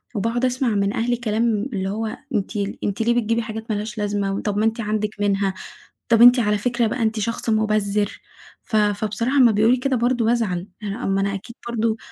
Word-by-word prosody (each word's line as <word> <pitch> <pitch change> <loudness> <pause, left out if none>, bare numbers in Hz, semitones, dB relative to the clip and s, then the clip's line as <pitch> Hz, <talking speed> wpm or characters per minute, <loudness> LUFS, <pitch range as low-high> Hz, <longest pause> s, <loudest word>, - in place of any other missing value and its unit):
وباقعد 230 +4 0
أسمع 255 +1 0
من 200 -2 0
أهلي 240 +2 0
كلام 225 0 0
اللي 190 -2 -2
هو 215 +2 -3 0.2
أنتِ 200 - -1 0.3
أنتِ 200 +2 -2
ليه 235 +1 +2
بتجيبي 230 -1 +1
حاجات 220 -1 -6
ما - - 0
لهاش 210 +2 -5
لازمة؟ 200 -1 -1
طَب 205 -1 -2
ما 215 - +2
أنتِ 225 +1 0
عندِك 215 0 -1
منها، 200 -1 +1 0.6
طَب 230 -1 +4
أنتِ 245 +1 +9
على 210 -2 +2
فكرة 240 +2 0
بقى 240 +3 -3
أنتِ 220 0 0
شخص 230 +2 -2
مبذِّر، 210 -2 0 0.4
ف 225 - -4
فبصراحة 215 +5 +1
أمّا 250 -4 +7
بيقولوا 220 +4 +4
لي 250 - -7
كده 270 0 +1
برضه 240 0 +1
بازعل، 210 -6 0 0.2
آآ - - -3 0.2
ما 195 0 +1
أنا 200 0 0
أكيد 215 +4 -9
برضه 230 -1 0
220 Hz, 205 wpm, -22 LUFS, 205-235 Hz, 0.6 s, أنتِ